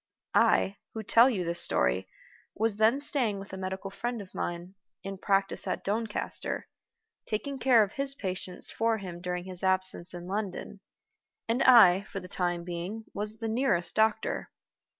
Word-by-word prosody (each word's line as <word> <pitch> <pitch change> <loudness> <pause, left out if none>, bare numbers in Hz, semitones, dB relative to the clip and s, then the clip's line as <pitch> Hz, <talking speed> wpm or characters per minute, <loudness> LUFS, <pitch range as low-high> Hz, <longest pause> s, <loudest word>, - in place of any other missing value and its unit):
I, 195 +1 +3 0.2
who 220 - -4
tell 230 +5 +6
you 190 -8 -1
this 170 +1 +2
story, 65 0 +1 0.5
was 220 -1 0
then 220 +5 +4
staying 255 -8 0
with 195 0 -9
a - - -3
medical 190 +1 -5
friend 240 +4 -3
of 195 -3 -10
mine, 175 +2 -4 0.3
in 195 -1 -6
practice 195 0 +1
at - - -2
Doncaster, 215 +2 -2 0.6
taking 265 +6 -3
care 245 -4 +5
of 200 - -4
his 275 0 0
patients 185 -4 -4
for 225 0 +1
him 180 -4 -8
during 180 -1 -3
his 185 -1 -6
absence 185 -1 +1
in 175 0 -7
London; 200 +1 -4 0.7
and 230 +3 +1
I, 200 -7 +8
for 195 - -6
the 180 - -10
time 175 -1 -1
being, 180 +6 -5
was 210 +2 -4
the 225 - -4
nearest 220 -7 +1
doctor. 220 0 +1
195 Hz, 165 wpm, -29 LUFS, 180-225 Hz, 0.7 s, I